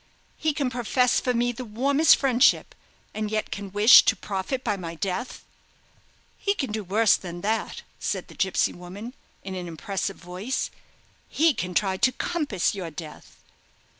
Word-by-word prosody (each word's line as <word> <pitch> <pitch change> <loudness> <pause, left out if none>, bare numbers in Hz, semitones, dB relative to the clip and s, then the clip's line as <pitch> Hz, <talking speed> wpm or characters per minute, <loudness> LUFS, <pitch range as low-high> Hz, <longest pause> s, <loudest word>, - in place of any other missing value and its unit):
he 315 - 0
can 280 -3 -2
profess 250 +1 +2
for 250 - 0
me 245 0 +1
the 250 +2 -7
warmest 275 +7 +4
friendship, 255 -3 +3 0.4
and 215 0 -3
yet 215 0 -2
can 200 -1 -6
wish 205 +4 +8
to - - +2
profit 205 +7 -4
by 210 -3 0
my 170 -3 -6
death!" 190 +8 -4 1.0
"He 400 0 0
can 270 - -3
do 215 0 -3
worse 210 +4 +4
than 175 -1 -7
that," 220 +3 -2 0.2
said - - -3
the - - -13
gipsy 190 -1 +1
woman, 195 +7 -9 0.3
in 190 - -6
an 180 -1 -5
impressive 195 +4 -4
voice; 180 +9 -4 0.6
"he 320 0 +3
can 180 -5 -4
try 190 -2 +1
to 245 +5 +3
compass 285 - -1
your 185 -4 -5
death!" 155 0 -10
210 Hz, 165 wpm, -25 LUFS, 185-250 Hz, 1.0 s, wish